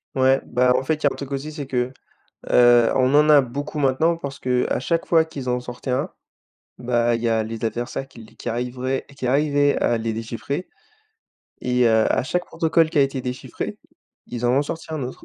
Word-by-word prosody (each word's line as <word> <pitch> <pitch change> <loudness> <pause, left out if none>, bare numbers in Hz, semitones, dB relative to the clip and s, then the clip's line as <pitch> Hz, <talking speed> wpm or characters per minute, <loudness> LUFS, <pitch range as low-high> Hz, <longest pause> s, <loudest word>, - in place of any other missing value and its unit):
Ouais, 135 0 +3
bah, 125 +1 +2
en - - 0
fait, 160 +4 +1
il 155 - -13
y - - +7
a - - +4
un - - -5
truc 140 -1 -8
aussi 140 +3 -4
c'est 145 -3 -6
que, 125 0 -1 0.6
heu, 120 -1 +6
on 130 +1 +3
en 150 +1 +5
a 145 -2 +8
beaucoup 140 +5 -5
maintenant 145 +4 +2
parce 140 -4 -7
qu'à 125 -1 0
chaque 165 +6 -1
fois 165 -1 +4
qu'ils 140 -5 -6
en 125 0 0
sortaient 125 +1 -8
un, 125 - 0 0.7
bah, 120 -1 +1
il 115 - -2
y 120 - +1
a 110 -1 +2
les 115 +1 -4
adversaires 120 +4 -4
qui 125 -3 -14
l - - -13
qui - - -6
arriveraient 125 +3 -2
qui 130 - -4
arrivaient 145 +2 +2
à 120 - +1
les 110 0 -2
déchiffrer. 115 +9 -4 1.0
Et 125 -1 +2
heu, 110 -1 +4
à - - +1
chaque 175 +7 -2
protocole 165 0 +1
qui 160 - 0
a - - +7
été 135 -1 0
déchiffré, 125 +1 -5 0.5
ils 120 0 -5
en 120 - +3
ont 140 - +3
sorti 160 +3 -6
un 155 -4 -3
autre 125 - -7
130 Hz, 220 wpm, -22 LUFS, 120-145 Hz, 1.0 s, a